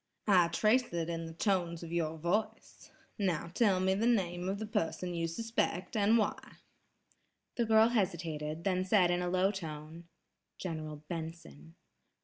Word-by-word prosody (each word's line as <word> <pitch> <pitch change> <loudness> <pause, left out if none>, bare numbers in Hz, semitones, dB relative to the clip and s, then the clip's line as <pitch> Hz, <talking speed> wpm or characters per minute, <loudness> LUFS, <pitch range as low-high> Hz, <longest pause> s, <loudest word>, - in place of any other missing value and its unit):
"I 185 -5 +5
trace 215 +9 +2
it 170 -1 -2
in 165 -1 -3
the 165 - -8
tones 175 -2 0
of 165 - -8
your 160 -2 -1
voice. 200 +7 -3 0.3
Now 175 -4 -1
tell 200 -4 +3
me 190 0 +2
the 215 +4 +1
name 180 -6 +1
of 195 - -1
the 220 - -4
person 180 -4 -2
you 165 -1 -1
suspect 185 -1 -2
and 215 +2 +4
why." 215 - 0 1.2
The 235 - +1
girl 220 +1 +5
hesitated, 165 -7 -2
then 185 -1 +1
said 185 -2 +4
in 175 0 +1
a 180 - -1
low 185 +2 +2
tone: 160 -3 -7 0.5
"General 155 -4 -5
Benson!" 160 - -7
175 Hz, 155 wpm, -32 LUFS, 165-205 Hz, 1.2 s, I